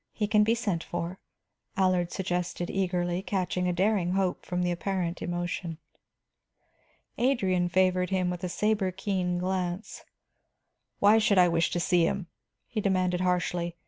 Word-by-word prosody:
He 210 - -1
can 210 0 +4
be 225 +2 +2
sent 200 -8 -2
for," 175 +2 -4 0.6
Allard 185 -2 +2
suggested 180 -2 -2
eagerly, 180 -2 0
catching 185 -2 -1
a - - +2
daring 185 0 +1
hope 190 -2 -1
from 180 0 -1
the 175 - +1
apparent 175 -1 -2
emotion. 175 -1 -3 1.4
Adrian 190 -9 +2
favored 185 0 +2
him 185 -2 0
with 180 0 -6
a 180 - -1
saber 210 0 +1
keen 185 -2 -1
glance. 185 +2 -3 0.9
"Why 210 +2 +5
should 210 -2 +3
I 180 -1 +7
wish 165 0 +2
to 175 - -1
see 175 -1 +3
him?" 195 -3 -2 0.4
he 215 - -3
demanded 185 -2 +1
harshly. 175 -1 0
180 Hz, 145 wpm, -28 LUFS, 175-195 Hz, 1.4 s, I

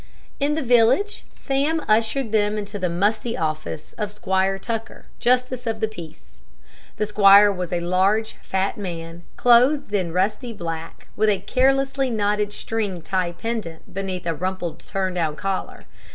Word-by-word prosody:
In 290 +1 +1
the 315 - -1
village, 245 - +3
Sam 280 +4 0
ushered 225 +3 +1
them 210 -1 +2
into 205 0 -5
the 180 -2 0
musty 210 +6 0
law 160 - +1
office 155 0 -9
of 210 -1 -2
Squire 190 -1 0
Tucker, 225 +2 -5
justice 250 0 +1
of 225 -1 -1
the 220 - +1
peace. 160 - -12 0.6
The 215 - 0
squire 205 0 +7
was 180 -2 -4
a 175 -1 -1
large, 190 +5 +2
fat 190 +1 -1
man, 170 -3 -6 0.2
clothed 250 +1 +4
in 185 -5 0
rusty 210 +7 -1
black, 165 -4 -6
with 215 +1 +3
a 205 - +3
carelessly 270 +5 +1
knotted 210 -2 0
string 205 -6 -3
tie 180 -2 -1
pendent 200 -4 -5
beneath 190 -2 -4
a 165 - 0
rumpled 175 -1 -4
turn 190 +1 -2
down 160 -4 -1
collar. 195 +3 -4
205 Hz, 155 wpm, -23 LUFS, 180-230 Hz, 0.6 s, squire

